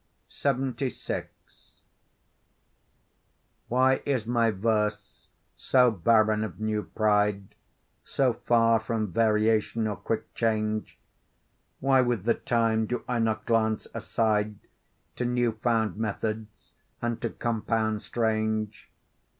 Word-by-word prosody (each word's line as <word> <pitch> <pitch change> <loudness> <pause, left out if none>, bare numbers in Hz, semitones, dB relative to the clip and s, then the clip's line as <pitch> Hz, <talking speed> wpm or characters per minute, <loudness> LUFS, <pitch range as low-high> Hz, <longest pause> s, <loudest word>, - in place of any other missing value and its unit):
LXXVI 135 -2 -2 2.4
Why 130 +2 +3
is 130 -6 -1
my 115 -1 +2
verse 105 0 -2 0.3
so 125 -2 +3
barren 110 +2 +3
of 110 -3 -6
new 110 -1 -1
pride, 105 -2 0 0.5
So 130 -3 +1
far 115 -1 +3
from 110 -3 -2
variation 110 +1 +2
or 105 -1 -1
quick 110 -1 -4
change? 110 -1 -1 0.8
Why 135 -1 +4
with 120 -6 0
the 115 +2 +3
time 115 -2 0
do 125 - -3
I 125 -2 0
not 110 -1 0
glance 110 -2 +1
aside 110 -1 0 0.6
To 125 - -1
new 120 -1 +1
found 110 -1 0
methods, 110 0 -4 0.3
and 120 -1 -3
to 115 - -1
compounds 110 -2 -1
strange? 110 -2 -1
110 Hz, 105 wpm, -27 LUFS, 110-120 Hz, 2.4 s, Why